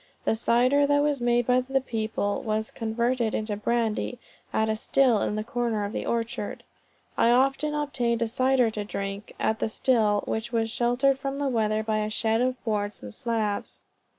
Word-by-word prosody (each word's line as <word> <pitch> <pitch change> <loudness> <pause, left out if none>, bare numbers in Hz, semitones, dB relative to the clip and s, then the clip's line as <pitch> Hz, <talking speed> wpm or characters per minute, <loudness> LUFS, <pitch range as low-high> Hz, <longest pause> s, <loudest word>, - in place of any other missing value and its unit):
The - - +2
cider 250 +5 +3
that 285 0 +3
was 290 -3 0
made 240 0 +2
by 250 +1 +3
the 270 +1 0
people 220 -5 -2
was 220 0 -2
converted 235 +1 -1
into 215 -1 -2
brandy, 230 +2 -1 0.3
at 220 - +1
a 220 - +1
still 245 0 +2
in 210 - -1
the 215 - -2
corner 235 -3 -1
of 205 - -5
the - - -3
orchard. 235 +1 -3 0.6
I 230 - +5
often 275 +4 +2
obtained 240 -6 0
cider 255 0 +2
to 210 -1 -4
drink, 200 0 -5
at 220 - 0
the - - 0
still, 215 -3 +2
which 220 +1 -3
was 225 -1 0
sheltered 250 +3 +2
from 275 0 -3
the 285 -1 0
weather 215 -3 +1
by 215 -1 0
a 210 0 -1
shed, 225 +1 +1
of 255 0 +1
boards 210 - -2
and 105 -1 -8
slabs. 220 - -2
230 Hz, 180 wpm, -26 LUFS, 215-255 Hz, 0.6 s, I